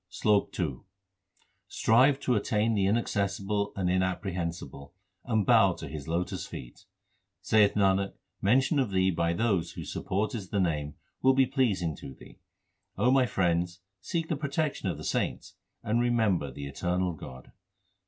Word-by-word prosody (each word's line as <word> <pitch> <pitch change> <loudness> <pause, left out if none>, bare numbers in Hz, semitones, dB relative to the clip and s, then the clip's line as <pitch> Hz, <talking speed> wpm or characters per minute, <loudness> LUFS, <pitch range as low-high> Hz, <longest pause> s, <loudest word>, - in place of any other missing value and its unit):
SLOK 105 -2 +1
II 70 -8 -1 0.9
Strive 130 +5 +3
to 125 - +1
attain 110 +1 +1
the 100 -3 +2
Inaccessible 100 -1 0
and 95 -2 -1
Inapprehensible, 90 -4 -2 0.3
and 110 -5 +1
bow 110 -6 +5
to 80 - -8
His 70 -1 -7
lotus 90 +3 -2
feet. - - -10 0.6
Saith 105 +1 +4
Nanak, 100 -1 +2 0.3
mention 130 +8 +3
of 130 -5 +1
Thee 95 -1 +2
by 85 0 0
those 100 -3 0
whose - - -7
support 100 +3 -2
is 100 -6 -5
the 100 - 0
Name, 75 -5 -1 0.3
will 130 0 +4
be 135 0 +5
pleasing 110 - 0
to 65 - -9
Thee. - - -16 0.6
O 125 - +3
my 130 -2 +4
friends, 90 -2 0 0.2
seek 165 -1 -3
the 160 - -1
protection 140 -6 -2
of 85 - -3
the 75 - -8
saints - - -2 0.3
and 115 +3 +1
remember 110 - +1
the 70 +2 -7
eternal 90 +5 -1
God. 65 -4 -11
95 Hz, 155 wpm, -29 LUFS, 85-115 Hz, 0.9 s, bow